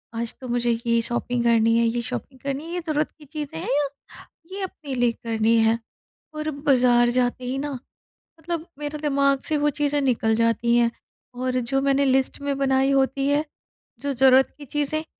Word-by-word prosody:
आज 230 0 -3
तो 255 - -7
मुझे 240 -1 +1
ये 235 0 +3
शॉपिंग 240 +1 -1
करनी 230 -1 +4
है 235 - +3
ये 240 +1 -1
शॉपिंग 260 +3 -6
करनी 275 +2 -4
है 335 - -7
ये 355 - -1
ज़रूरत 305 0 0
की 300 - -14
चीज़ें 295 - -6
हैं - - -4
या, 290 -1 +1 0.6
ये 395 +1 -4
अपने 310 -7 -6
लिए 245 -2 +2
करनी 225 0 0
है 225 +1 +3 0.6
और 305 0 -3
बाज़ार 250 -4 +3
जाते 250 0 0
ही 255 +2 -2
ना, 290 +1 -3 0.7
मतलब 335 0 -4
मेरे 295 0 -4
दिमाग 280 -2 +2
से 310 - +1
वो 295 0 +2
चीज़ें 290 0 0
निकल 235 -5 +1
जाती 230 +1 +2
हैं 235 -1 +3 0.5
और 255 0 -1
जो 270 - +2
मैंने 275 0 +3
लिस्ट 265 0 +1
में 280 -1 -1
बनाई 270 0 +2
होती 270 0 +1
है, 290 +2 +2 0.6
जो 285 0 -2
ज़रूरत 265 +1 +5
की 290 - -9
चीज़ें, 295 +3 -1
265 Hz, 190 wpm, -24 LUFS, 240-290 Hz, 0.7 s, ज़रूरत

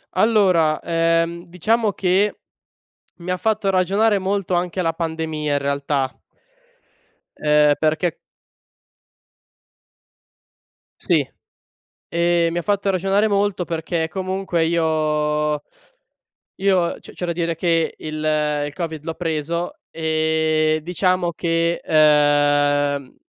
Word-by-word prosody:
Allora, 185 -8 +3
ehm, 165 +1 0
diciamo 210 +5 0
che, 195 +3 +1 0.8
mi 175 +1 -5
ha 180 - 0
fatto 215 -1 0
ragionare 200 +3 +2
molto 195 -1 -2
anche 180 +1 -1
la 165 -2 +1
pandemia 160 -2 -3
in - - +2
realtà 140 -1 -1 1.2
ehm, 150 -1 +4
perché 155 +2 0 2.9
Sì, - - +2 0.8
ehm, 170 0 +1
mi - - -3
ha - - -2
fatto 200 +1 0
ragionare 195 +3 +2
molto, 200 -3 0
perché 165 0 -2
comunque 185 -1 -2
io 150 -2 0 0.9
io 190 -3 +1
c'è - - -14
c'è 180 - -5
da 170 - -2
dire 170 -1 -2
che, 165 -1 0
il 155 0 -6 0.5
il 145 - -8
Covid 160 -3 -5
l'ho 165 - -3
preso 165 - -3
e 155 -1 +1
diciamo 180 +1 0
che, 170 0 0
ehm, 145 -2 +3
165 Hz, 105 wpm, -21 LUFS, 155-185 Hz, 2.9 s, ehm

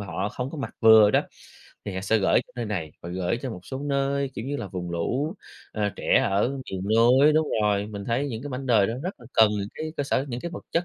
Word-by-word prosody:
và 100 - -6
họ 95 +3 -2
không 125 +5 -5
có 160 - -7
mặc 135 - -5
vừa 110 -2 +8
đó, - - +3 0.6
thì 100 - -5
họ 95 - -3
sẽ 110 +3 +2
gửi 95 - +3
cho - - -23
nơi 120 - -2
này 85 -8 -4
và 85 - -8
gửi 90 +4 -1
cho 130 - -3
một 90 - -7
số 130 - -5
nơi, 140 -1 -1
kiểu, 115 - -5
như 145 +1 -2
là 100 - -5
vùng 90 -2 -5
lũ, 130 - -1 0.4
ờ, 105 -1 0
trẻ - - +3
ở 100 +4 +2 0.2
miền 95 -1 -4
núi. 125 +7 +5
Đúng 155 0 +2
rồi, 105 -1 +1
mình 100 -2 -7
thấy 125 +6 -1
những 115 -3 -5
cái 145 - -6
mảnh 130 +1 -5
đời 110 -6 +4
đó 115 - -2
rất 180 -4 -5
là 120 - -13
cần 110 -2 +5
những 100 -1 -3
cái 155 0 -5
cơ - - 0
sở 135 -1 0
những 120 -1 -4
cái 170 - -5
vật 165 - -8
chất 170 - +1
115 Hz, 275 wpm, -25 LUFS, 100-140 Hz, 0.6 s, vừa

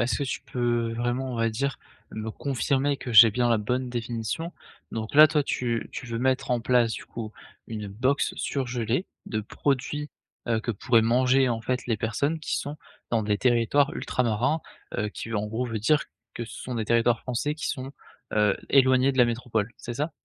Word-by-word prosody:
est-ce 120 -2 +1
que 140 - -1
tu 125 - -3
peux 120 -2 -1
vraiment, 120 +2 -2
on - - -4
va 115 0 +2
dire, 135 +4 -2 0.3
me 110 0 -4
confirmer 140 +2 0
que 125 - -6
j'ai 110 0 +10
bien 120 +2 +1
la 115 -2 +3
bonne 125 +4 -1
définition. 120 +7 -3 0.4
Donc, 110 +3 -4
là, 155 +1 +10
toi, 150 -1 +1
tu 120 -4 -2
tu 125 - -7
veux 115 -1 -3
mettre 130 +1 0
en 125 -1 +2
place, 120 -1 +3
du - - -6
coup, 110 -2 -7 0.3
une 105 -2 -5
box 130 +8 0
surgelée 125 - -1 0.2
de 110 -2 -2
produits, 140 +6 -2 0.4
heu, 115 -1 +2
que 120 - -3
pourraient 115 +2 +3
manger, 130 +3 +3
en 115 -1 -1
fait, 125 +2 -2
les 115 -3 +1
personnes 130 +9 -1
qui 155 - -2
sont 145 +1 -4 0.3
dans 115 -2 +2
des 105 -1 0
territoires 125 +4 +3
ultramarins, 125 +6 0 0.4
heu, 105 +1 0
qui, 115 +2 -7
en 105 0 0
gros, 115 +4 -2
veut 115 -2 -3
dire 150 +7 +3 0.3
que 120 - -4
ce 115 - -10
sont 125 - -5
des 110 - -1
territoires 115 +1 +2
français 130 +4 -2
qui 155 - -3
sont, 130 0 -4 0.4
heu, 105 -2 +3
éloignés 130 -1 +5
de 130 - -5
la 125 - +8
métropole, 115 -2 -1
c'est 120 - -7
ça? 150 +6 -2
120 Hz, 200 wpm, -26 LUFS, 115-130 Hz, 0.4 s, j'ai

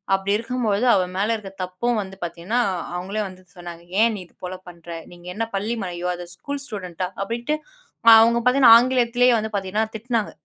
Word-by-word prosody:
அப்டி 195 +1 -2
இருக்கும் 245 +2 -3
பொழுது 205 +3 +1
அவ 185 - +3
மேல 210 +4 +1
இருக்க 205 -3 -8
தப்பும் 215 +6 -1
வந்து 190 -1 -8
பார்த்தீங்கன்னா, 175 +7 -2 0.4
அவங்களே 195 +4 -3
வந்து 185 0 -13
சொன்னாங்க. 175 -1 -9 0.2
ஏன் 230 0 +4
நீ 200 - -7
இது - - -32
போல 180 +1 -5
பண்ற? 170 -1 -15 0.2
நீங்க 175 0 -14
என்ன 225 +2 -1
பள்ளி 210 +4 -1
மலையோ 175 -1 -4
அது 175 0 -8
ஸ்கூல் 285 +8 -6
ஸ்டூடண்ட்டா? 185 - -5 0.2
அப்டின்ட்டு 235 +8 -2 0.6
அவங்க 230 +1 +4
பார்த்தீங்கன்னா, 250 -2 +7
ஆங்கிலத்திலேயே 245 0 +3
வந்து 220 0 -4
பார்த்தீங்கன்னா, 200 +2 -1
திட்னாங்க. 230 -1 -2
210 Hz, 180 wpm, -22 LUFS, 185-235 Hz, 0.6 s, பார்த்தீங்கன்னா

